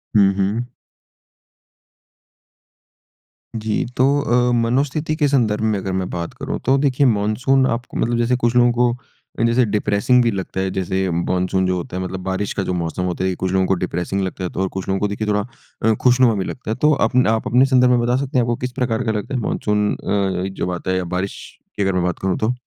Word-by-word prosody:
हुँ, 100 -2 +6
हुँ। 105 +5 -1 2.9
जी। 110 -1 -1
तो 130 - +4 0.2
अ, 125 -1 +2
मनोस्थिति 135 +6 0
के 150 -2 +2
संदर्भ 115 -7 +1
में 110 -2 +1
अगर 95 0 -4
मैं 95 -1 -2
बात 85 -1 -5
करूँ, - - -5
तो 135 +2 +4
देखिए 140 0 +2
मानसून 120 +5 +2
आपको 115 +1 -3
मतलब 120 0 0
जैसे 120 +1 +2
कुछ 120 -1 0
लोगों 120 0 +5
को 120 0 +2 0.5
अ, 115 - +2
जैसे 115 +1 +3
डिप्रेसिंग 105 +3 +2
भी 115 - +2
लगता 95 -1 -4
है, 95 - -1
जैसे 95 0 -1
मानसून 90 +2 0
जो 90 - +1
होता 90 +1 -5
है 95 - -2
मतलब 95 0 -5
बारिश 95 +1 -2
का 95 - -2
जो 90 - -2
मौसम 85 +1 -2
होता 90 0 -2
है, 95 - +1
ये 90 - -2
कुछ 95 0 -2
लोगों 95 0 +2
को 95 - +2
डिप्रेसिंग 90 +3 -2
लगता 95 0 -4
है, 90 - -2
तो 95 - -4
और 95 - +1
कुछ 95 0 -6
लोगों 95 0 0
को 105 - +1
देखिए 105 +1 -4
थोड़ा 105 0 +1 0.4
अ, 110 0 +4
खुशनुमा 125 -2 +4
भी 95 -2 -2
लगता 125 -4 -5
है। - - -1
तो 150 - +5 0.2
अपने 125 -3 +2
आप 110 0 0
अपने 125 +3 +4
संदर्भ 125 -2 +4
में 125 - +4
बता 120 +1 +1
सकते 135 -1 -2
हैं 120 - +4
आपको 120 0 0
किस 125 - -4
प्रकार 120 -1 0
का 110 - +1
लगता 110 +5 -4
है 130 - 0
मानसून 105 -1 0
अ, 95 -2 -1
जब 90 - -2
आता 90 +1 -3
है 95 - +1
या 95 - -1
बारिश 95 +2 -3 0.4
की 100 - +1
अगर 95 -1 +1
मैं 90 - 0
बात 90 -1 -2
करूँ 95 -1 -1
तो? 110 +3 0
105 Hz, 230 wpm, -20 LUFS, 95-125 Hz, 2.9 s, हुँ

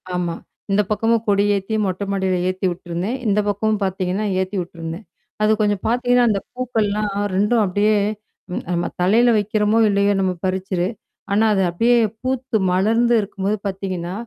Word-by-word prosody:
ஆமா. 175 -2 -1 0.4
இந்த 200 +1 +4
பக்கமும் 225 +2 +1
கொடி 200 -1 +3
ஏத்தி, 200 +3 -2
மொட்டை 190 +1 -2
மாடியில 190 -2 0
ஏத்தி 185 +1 -3
விட்டுருந்தேன். 175 +6 -4
இந்த 210 0 +2
பக்கமும் 210 +1 0
பாத்தீங்கன்னா, 190 +1 -1
ஏத்தி 190 +2 -2
விட்ருந்தேன். 170 +2 -7 0.4
அது 215 - +4
கொஞ்சம் 205 -2 +1
பாத்தீங்கன்னா, 245 +1 +3
அந்த 205 -2 +1
பூக்கள்லாம் 215 -5 -1 0.2
2ம் 210 +4 +2
அப்டியே 205 +3 +2 0.6
ம் - - -3
நம்ம 175 0 0 0.2
தலையில 225 +7 +4
வைக்கிறோமோ, 210 +1 +1
இல்லையோ! 200 0 +2
நம்ம 185 -1 +1
பறிச்சது 185 -1 -1 0.5
ஆனா, 215 +2 +3
அது 195 - +2
அப்படியியே 230 +8 +3 0.2
பூத்து 260 -2 -1
மலர்ந்து 225 +6 +2
இருக்கும்போது 200 +1 -2
பாத்தீங்கன்னா, 185 -2 -4
200 Hz, 145 wpm, -20 LUFS, 185-220 Hz, 0.6 s, இந்த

